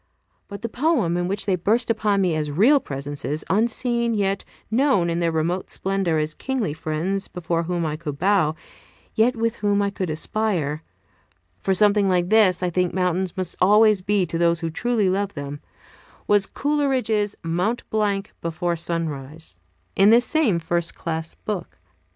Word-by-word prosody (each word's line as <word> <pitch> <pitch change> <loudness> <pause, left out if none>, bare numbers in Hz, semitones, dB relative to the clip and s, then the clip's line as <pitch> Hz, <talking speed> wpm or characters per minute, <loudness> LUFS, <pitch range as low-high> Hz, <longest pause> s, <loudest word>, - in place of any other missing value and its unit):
But 200 +2 -9
the - - -1
poem 245 - +1
in 175 0 -1
which 195 +2 -2
they 195 -2 +2
burst 225 +7 +1
upon 210 -3 +1
me 180 -3 +1
as 155 -1 -2
real 225 - +4
presences, 145 - -5
unseen, 235 +2 +1
yet 195 -1 0 0.3
known 225 -8 +2
in 170 - -1
their 170 -1 +1
remote 165 +3 -1
splendor 190 -4 -1
as 155 0 -1
kingly 245 - -2
friends 165 +6 -2
before 170 -1 -2
whom 175 -1 -1
I 155 -1 -2
could 150 -3 -6
bow, 180 -3 +2 0.6
yet 240 +3 +3
with 230 0 -1
whom 205 -1 +1
I 200 0 +1
could 185 -3 -3
aspire, 160 -3 -1 0.8
for 190 - +1
something 205 0 +4
like 180 -1 +1
this 200 -5 +4
I 180 - 0
think 180 +1 0
mountains 180 0 -1
must 185 -2 -3
always 210 +1 +5
be 200 0 +1
to 165 0 -4
those 170 0 +2
who 165 -1 -2
truly 230 +2 0
love 195 +1 -1
them, 145 0 -6 0.7
was 205 -1 +3
Coleridge's 260 -8 0
"Mont 180 +8 -1
Blanc 205 -2 -1
before 170 +1 -2
Sunrise," 160 -2 -5 0.4
in 195 +2 +5
this 235 +2 +5
same 295 - +2
"First 170 0 -1
Class 160 -1 -4
Book." 200 -5 -5
190 Hz, 165 wpm, -23 LUFS, 165-215 Hz, 0.8 s, always